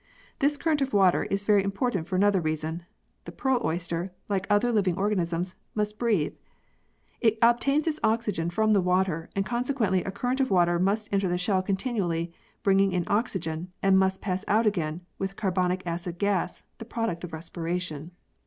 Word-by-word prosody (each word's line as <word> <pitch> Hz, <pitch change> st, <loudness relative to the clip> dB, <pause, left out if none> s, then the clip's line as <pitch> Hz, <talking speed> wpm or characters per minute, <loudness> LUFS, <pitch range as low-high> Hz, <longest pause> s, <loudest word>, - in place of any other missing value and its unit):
This 290 Hz, +1 st, +2 dB
current 310 Hz, -2 st, +1 dB
of 275 Hz, 0 st, -1 dB
water 190 Hz, -3 st, +4 dB
is 200 Hz, +1 st, -2 dB
very 205 Hz, -2 st, +4 dB
important 195 Hz, -3 st, -1 dB
for 185 Hz, -, -2 dB
another 200 Hz, 0 st, +3 dB
reason 155 Hz, +1 st, -2 dB, 0.4 s
the -, -, -7 dB
pearl 265 Hz, -3 st, 0 dB
oyster, 170 Hz, +2 st, -2 dB, 0.2 s
like 195 Hz, -1 st, -1 dB
other 205 Hz, +4 st, +3 dB
living 195 Hz, -6 st, +2 dB
organisms, 180 Hz, -3 st, -1 dB, 0.2 s
must 210 Hz, 0 st, -2 dB
breathe. 215 Hz, -11 st, +1 dB, 0.9 s
It 225 Hz, -2 st, +3 dB
obtains 260 Hz, +6 st, +3 dB
its 310 Hz, -2 st, -1 dB
oxygen 210 Hz, -7 st, +1 dB
from 215 Hz, +4 st, +2 dB
the 200 Hz, -, +4 dB
water, 180 Hz, -2 st, 0 dB
and 195 Hz, -1 st, 0 dB
consequently 240 Hz, -4 st, 0 dB
a -, -, -4 dB
current 245 Hz, +7 st, -2 dB
of 265 Hz, -, +2 dB
water 175 Hz, -2 st, +3 dB
must 205 Hz, +4 st, 0 dB
enter 195 Hz, -2 st, +2 dB
the 175 Hz, -, 0 dB
shell 185 Hz, +1 st, +1 dB
continually, 185 Hz, -5 st, -1 dB, 0.3 s
bringing 195 Hz, -1 st, +3 dB
in 180 Hz, -1 st, +1 dB
oxygen, 180 Hz, -6 st, -1 dB
and 195 Hz, -1 st, +5 dB
must 190 Hz, 0 st, +1 dB
pass 185 Hz, -1 st, -2 dB
out 220 Hz, +2 st, +3 dB
again 170 Hz, -5 st, 0 dB, 0.2 s
with 195 Hz, 0 st, -3 dB
carbonic 185 Hz, -2 st, 0 dB
acid 170 Hz, 0 st, -4 dB
gas, 190 Hz, -2 st, 0 dB, 0.2 s
the 225 Hz, -, -7 dB
product 225 Hz, -7 st, -3 dB
of 175 Hz, -, -6 dB
re 160 Hz, -, -5 dB
spiration. 170 Hz, -2 st, -4 dB
195 Hz, 175 wpm, -27 LUFS, 175-215 Hz, 0.9 s, and